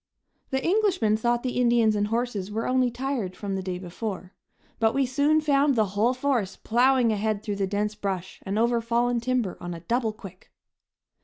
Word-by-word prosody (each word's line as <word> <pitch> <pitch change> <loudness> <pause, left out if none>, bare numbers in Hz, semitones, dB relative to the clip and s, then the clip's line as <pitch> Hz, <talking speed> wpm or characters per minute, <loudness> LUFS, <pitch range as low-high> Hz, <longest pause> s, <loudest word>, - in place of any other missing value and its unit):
The 265 0 -1
Englishmen 370 - +2
thought 240 +2 0
the 250 -1 -1
Indians 235 -3 +3
and 205 0 +1
horses 225 -4 -2
were 220 +2 -2
only 255 -1 +2
tired 240 -6 -3
from 200 -2 -4
the 190 - -2
day 185 -1 -4
before, 185 +1 -6 0.5
but 225 -1 +2
we 275 -1 +3
soon 285 +5 +2
found 285 -2 +3
the 215 -4 +2
whole 230 +5 +2
force 250 -7 0
plowing 245 0 +3
ahead 215 0 -1
through 205 -2 -3
the 195 -1 0
dense 205 +2 -1
brush 190 -3 -4
and 195 +2 -3
over 235 +1 +2
fallen 235 +1 +1
timber 240 -5 -1
on 175 0 -5
a 165 - -9
double 230 +5 0
quick. 195 -4 -13
230 Hz, 185 wpm, -26 LUFS, 205-255 Hz, 0.5 s, Indians